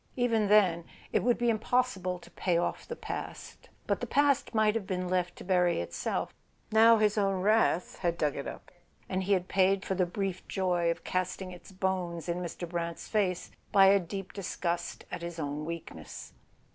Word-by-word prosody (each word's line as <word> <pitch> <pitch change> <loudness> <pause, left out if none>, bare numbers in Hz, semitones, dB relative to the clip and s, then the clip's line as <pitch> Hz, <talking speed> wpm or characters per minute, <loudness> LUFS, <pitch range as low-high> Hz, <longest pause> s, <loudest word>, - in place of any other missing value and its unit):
Even 230 -4 +2
then, 190 -5 +4 0.3
it - - +3
would 245 -1 +2
be 240 -1 +2
impossible 220 -5 0
to 175 - -16
pay 175 -3 0
off 170 - -2
the 475 - -5
past—but - - -6
the - - -2
past 280 -3 +2
might 215 -1 +4
have 220 -4 -3
been 185 -1 -2
left 180 -1 0
to - - -10
bury 180 - +2
itself. 85 - -3 0.4
Now 225 +1 +7
his 215 0 +2
own 195 -2 +1
wrath 210 -3 +2
had 170 -2 0
dug 150 -3 0
it 140 - -4
up, - - -9 0.4
and 185 0 -1
he 200 - +3
had 185 -1 +1
paid 190 0 +2
for - - -1
the 185 -1 +1
brief 190 0 -3
joy 180 -3 +1
of 170 - -2
casting 185 0 -2
its 180 +2 -12
bones 185 -3 -2
in 170 +1 -1
Mr. 175 0 -5
Brant's 170 -1 -4
face 190 -5 0 0.2
by 195 -1 +7
a 200 0 +6
deep 195 +2 -6
disgust 175 -3 -3
at - - -4
his 170 0 -6
own 150 -1 -3
weakness. 160 - -7
185 Hz, 185 wpm, -30 LUFS, 175-205 Hz, 0.4 s, Now